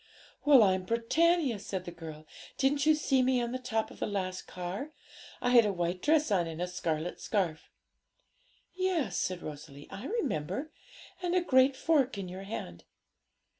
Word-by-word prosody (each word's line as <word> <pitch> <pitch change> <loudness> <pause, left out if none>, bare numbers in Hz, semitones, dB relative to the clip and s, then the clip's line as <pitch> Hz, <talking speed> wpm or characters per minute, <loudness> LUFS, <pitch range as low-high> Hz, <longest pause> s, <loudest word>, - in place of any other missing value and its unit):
'Well, 280 -6 +8
I'm 190 -2 +3
Britannia,' 245 - +2
said 190 -2 -5
the 175 - -6
girl; 160 -2 -9 0.3
'didn't 280 +2 +2
you 310 - +6
see 270 -3 +2
me 255 0 +2
on 240 -1 -2
the 255 - -3
top 225 -3 -2
of - - -13
the - - -1
last 185 -3 -3
car? 185 - -5 0.5
I 245 - 0
had 240 -2 +8
a 210 - +1
white 175 0 -2
dress 305 -4 +3
on 180 -4 +2
and 165 0 -6
a 180 - 0
scarlet 170 -2 -3
scarf.' 180 -7 -1 1.0
'Yes,' 355 - 0
said 180 -1 -2
Rosalie, 145 -1 -9
'I 215 +8 -6
remember; 290 - -2 0.5
and 355 0 0
a 365 - +4
great 260 -4 +4
fork 275 -5 +2
in 195 -2 -4
your 185 +2 -7
hand.' 85 - -6
215 Hz, 170 wpm, -30 LUFS, 180-275 Hz, 1.0 s, Well